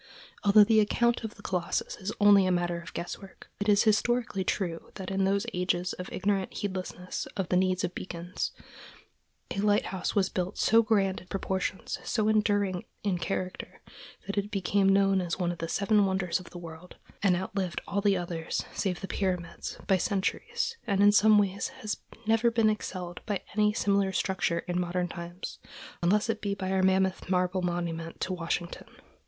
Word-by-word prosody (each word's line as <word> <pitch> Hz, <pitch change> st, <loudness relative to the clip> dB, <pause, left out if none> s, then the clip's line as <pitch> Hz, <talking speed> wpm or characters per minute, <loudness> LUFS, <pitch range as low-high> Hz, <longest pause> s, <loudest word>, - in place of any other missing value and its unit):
Although 210 Hz, +1 st, +8 dB
the 220 Hz, +1 st, +4 dB
account 235 Hz, +3 st, +2 dB
of 220 Hz, -, -5 dB
the 200 Hz, -, -15 dB
Colossus 180 Hz, -2 st, -1 dB
is 190 Hz, +2 st, -4 dB
only 200 Hz, -2 st, +6 dB
a -, -, +2 dB
matter 175 Hz, -1 st, 0 dB
of 170 Hz, -, -10 dB
guesswork, 190 Hz, +3 st, -7 dB
it 205 Hz, +1 st, 0 dB
is 205 Hz, -1 st, +5 dB
historically 220 Hz, -2 st, +1 dB
true 175 Hz, -3 st, -2 dB
that 190 Hz, -1 st, -6 dB
in 195 Hz, 0 st, +1 dB
those 200 Hz, +2 st, +1 dB
ages 180 Hz, 0 st, 0 dB
of 180 Hz, -, -7 dB
ignorant 195 Hz, 0 st, 0 dB
heedlessness 185 Hz, -2 st, -4 dB
of 190 Hz, -3 st, -2 dB
the -, -, +2 dB
need 185 Hz, 0 st, +2 dB
of 180 Hz, -, -1 dB
beacons, 175 Hz, 0 st, -4 dB, 1.0 s
a -, -, -2 dB
lighthouse 205 Hz, -2 st, +1 dB
was 195 Hz, -2 st, +3 dB
built 185 Hz, +1 st, -3 dB
so 225 Hz, +1 st, +5 dB
grand 200 Hz, -4 st, +1 dB
in 185 Hz, -, -17 dB
proportions, 190 Hz, 0 st, -2 dB
so 215 Hz, -2 st, 0 dB
enduring 205 Hz, -4 st, +1 dB, 0.2 s
in 190 Hz, -4 st, 0 dB
character, 185 Hz, 0 st, -4 dB, 0.5 s
that 200 Hz, +1 st, -1 dB
it 200 Hz, +1 st, -4 dB
became 195 Hz, 0 st, +2 dB
known 195 Hz, -1 st, +4 dB
as 175 Hz, -2 st, -2 dB
one 175 Hz, -2 st, 0 dB
of 175 Hz, -, -7 dB
the 165 Hz, -, -3 dB
Seven 205 Hz, +2 st, +3 dB
Wonders 190 Hz, -2 st, 0 dB
of 180 Hz, -, -12 dB
the 175 Hz, -, -10 dB
World, 170 Hz, +1 st, -10 dB, 0.3 s
and 195 Hz, -3 st, +4 dB
outlived 190 Hz, 0 st, -2 dB
all 200 Hz, -, 0 dB
the 200 Hz, -2 st, +3 dB
others, 170 Hz, -2 st, -3 dB
save 185 Hz, -3 st, -2 dB
the 195 Hz, -, -4 dB
Pyramids, 180 Hz, -4 st, -3 dB
by 190 Hz, -, +3 dB
centuries, 200 Hz, -, -1 dB
and 200 Hz, 0 st, +2 dB
in 205 Hz, -, +8 dB
some 210 Hz, +1 st, +6 dB
ways 200 Hz, -1 st, +1 dB
has 215 Hz, -1 st, -5 dB, 0.3 s
never 225 Hz, +2 st, +4 dB
been 225 Hz, -2 st, +3 dB
excelled 180 Hz, -4 st, -5 dB
by 205 Hz, -3 st, -2 dB
any 210 Hz, 0 st, +4 dB
similar 200 Hz, -2 st, +1 dB
structure 190 Hz, -3 st, 0 dB
in 180 Hz, 0 st, 0 dB
modern 180 Hz, 0 st, -1 dB
times, 175 Hz, +1 st, -7 dB, 0.4 s
unless 205 Hz, +6 st, +3 dB
it 225 Hz, -2 st, -1 dB
be 200 Hz, -1 st, -1 dB
by 190 Hz, -1 st, -3 dB
our 190 Hz, 0 st, +2 dB
mammoth 190 Hz, -1 st, +2 dB
marble 185 Hz, 0 st, +1 dB
monument 170 Hz, -2 st, -3 dB
to 185 Hz, -, -1 dB
Washington. 170 Hz, 0 st, -3 dB
190 Hz, 180 wpm, -29 LUFS, 180-205 Hz, 1.0 s, Although